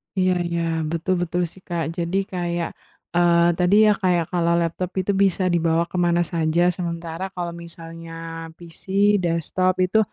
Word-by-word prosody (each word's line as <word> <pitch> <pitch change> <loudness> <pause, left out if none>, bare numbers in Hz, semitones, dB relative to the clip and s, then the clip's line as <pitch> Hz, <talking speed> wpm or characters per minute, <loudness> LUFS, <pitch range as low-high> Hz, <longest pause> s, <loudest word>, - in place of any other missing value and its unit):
Iya 185 -1 +2 0.2
iya, 170 0 -1 0.3
betul 170 +3 0
betul 175 +1 -1
sih, 190 - -17
Kak, 170 -2 -2
jadi 170 +3 -1 0.2
kayak, 175 -1 -2 0.5
eee, 170 -1 +4 0.2
tadi 180 +3 +4
ya, - - +6
kayak 175 -2 +2
kalau 170 -1 +2
laptop 170 +2 -2
itu 200 - 0
bisa 190 -1 +1
dibawa 165 0 +2
kemana 175 -1 +2
saja, 165 0 0
sementara 170 0 -4
kalau 175 -1 -3
misalnya 165 -1 -10 0.4
PC, 170 -2 -14 0.4
desktop 175 +2 0
itu, 195 +4 +2
170 Hz, 150 wpm, -22 LUFS, 170-180 Hz, 0.5 s, ya